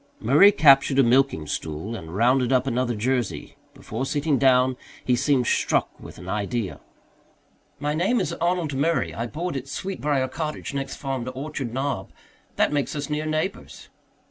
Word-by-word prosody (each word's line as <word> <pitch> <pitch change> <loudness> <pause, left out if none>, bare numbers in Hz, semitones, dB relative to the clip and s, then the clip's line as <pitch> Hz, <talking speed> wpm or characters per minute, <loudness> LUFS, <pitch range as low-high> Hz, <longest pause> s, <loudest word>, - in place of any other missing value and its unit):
Murray 150 - +6
captured 140 -5 +5
a 135 - +6
milking 125 - +2
stool 80 +8 -4
and 85 -4 -8
rounded 125 +3 +3
up 130 -1 +3
another 125 -2 0
Jersey. 115 - -2 0.2
Before 115 +4 -5
sitting 145 0 0
down 130 -1 +4 0.3
he 125 - +3
seemed 130 0 +2
struck - - +1
with - - -11
an 90 - -11
idea. 105 +1 -3 1.0
"My 145 +1 -1
name 190 +10 +1
is - - -1
Arnold 175 -4 -1
Murray. 155 +5 0
I 115 +1 -3
board 170 +6 -4
at 135 0 -5
Sweetbriar 145 -4 -2
Cottage, 155 0 -5
next 140 -1 -3
farm 135 -3 -4
to 130 - -4
Orchard 135 -2 -5
Knob. 130 -6 -3 0.5
That - - +2
makes 145 +1 -1
us 145 0 -4
near 150 +1 -2
neighbours." 155 +5 -4
135 Hz, 165 wpm, -24 LUFS, 120-150 Hz, 1.0 s, Murray